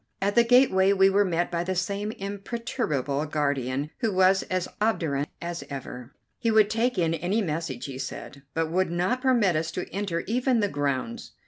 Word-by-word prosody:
At 200 Hz, +1 st, 0 dB
the 235 Hz, -, +6 dB
gateway 230 Hz, -6 st, +5 dB
we 195 Hz, 0 st, +5 dB
were 200 Hz, +1 st, +4 dB
met 175 Hz, -2 st, -1 dB
by 170 Hz, 0 st, -1 dB
the 185 Hz, +1 st, -2 dB
same 200 Hz, +3 st, -2 dB
imperturbable 200 Hz, -, -3 dB
guardian, 140 Hz, -1 st, -1 dB
who 225 Hz, -4 st, 0 dB
was 190 Hz, 0 st, +4 dB
as 185 Hz, -1 st, -1 dB
obdurate 155 Hz, -10 st, 0 dB
as 170 Hz, 0 st, -5 dB
ever. 130 Hz, -2 st, -7 dB, 0.3 s
He 230 Hz, -, 0 dB
would 215 Hz, -1 st, +4 dB
take 230 Hz, +1 st, 0 dB
in 165 Hz, -2 st, +2 dB
any 185 Hz, +7 st, 0 dB
message, 150 Hz, -7 st, -3 dB
he 135 Hz, -2 st, -6 dB
said, 140 Hz, +1 st, -7 dB
but 160 Hz, -1 st, 0 dB
would 185 Hz, +1 st, +1 dB
not 180 Hz, +9 st, 0 dB
permit 235 Hz, -, +3 dB
us 160 Hz, +1 st, 0 dB
to 180 Hz, -, -4 dB
enter 190 Hz, -4 st, -2 dB
even 250 Hz, +1 st, +1 dB
the 205 Hz, -2 st, +1 dB
grounds. 135 Hz, -6 st, -3 dB
Mr. -, -, -43 dB
185 Hz, 190 wpm, -26 LUFS, 150-210 Hz, 0.3 s, the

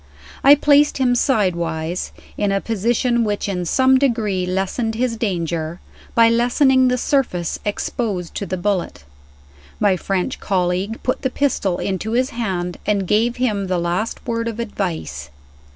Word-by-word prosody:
I 280 Hz, +2 st, +9 dB
placed 290 Hz, 0 st, +4 dB
him 255 Hz, -2 st, +2 dB
sidewise, 175 Hz, -, 0 dB, 0.2 s
in 205 Hz, -1 st, 0 dB
a 195 Hz, -, +1 dB
position 235 Hz, +3 st, 0 dB
which 205 Hz, -2 st, -1 dB
in 180 Hz, -3 st, -2 dB
some 260 Hz, +7 st, +4 dB
degree 215 Hz, -9 st, 0 dB
lessened 195 Hz, +5 st, -1 dB
his 240 Hz, 0 st, 0 dB
danger, 170 Hz, -6 st, -2 dB, 0.4 s
by 230 Hz, -1 st, +6 dB
lessening 255 Hz, +3 st, +3 dB
the 250 Hz, 0 st, +2 dB
surface 235 Hz, -, 0 dB
exposed 205 Hz, -3 st, -3 dB
to 200 Hz, -, -4 dB
the 185 Hz, -, -3 dB
bullet. 180 Hz, -, -2 dB, 0.8 s
My 205 Hz, -3 st, +3 dB
French 195 Hz, +7 st, -2 dB
colleague 185 Hz, +3 st, -1 dB
put 255 Hz, -, -1 dB
the 260 Hz, -, 0 dB
pistol 250 Hz, -10 st, 0 dB
into 200 Hz, +3 st, -3 dB
his 255 Hz, +2 st, +1 dB
hand, 185 Hz, -7 st, -3 dB
and 200 Hz, -3 st, 0 dB
gave 230 Hz, +5 st, +2 dB
him 215 Hz, -6 st, -1 dB
the 185 Hz, -1 st, 0 dB
last 175 Hz, +6 st, -2 dB
word 230 Hz, 0 st, -2 dB
of 230 Hz, 0 st, -4 dB
advice. 165 Hz, -, -4 dB
210 Hz, 150 wpm, -20 LUFS, 180-240 Hz, 0.8 s, I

